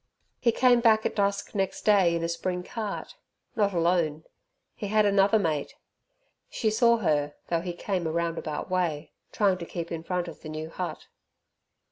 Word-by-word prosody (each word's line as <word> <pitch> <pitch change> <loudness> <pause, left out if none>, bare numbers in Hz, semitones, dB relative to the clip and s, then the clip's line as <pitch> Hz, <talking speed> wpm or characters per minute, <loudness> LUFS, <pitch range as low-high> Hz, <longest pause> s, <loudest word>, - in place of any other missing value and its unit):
He 235 - +3
came 245 +1 +4
back 220 -2 +4
at - - -1
dusk 200 -1 0
next 195 -2 -2
day 195 -5 +4
in 165 - -2
a - - +1
spring 180 +2 -2
cart 215 +1 -5 0.4
not 205 -2 +2
alone 170 -3 +1 0.5
he 205 - -5
had 215 +1 +3
another 200 +1 +4
mate. 155 -8 -1 0.7
She 220 -3 0
saw 235 +1 +4
her 150 -7 0
though 170 -1 +1
he 175 0 -4
came 180 -1 -2
a - - -1
roundabout 165 -2 -2
way, 175 -5 -1 0.2
trying 195 -3 +2
to 170 - -5
keep 170 -1 -5
in 165 -1 -3
front 180 +1 -2
of 165 - -10
the 155 - -8
new 155 +1 -6
hut. 180 0 -5
180 Hz, 175 wpm, -27 LUFS, 165-205 Hz, 0.7 s, came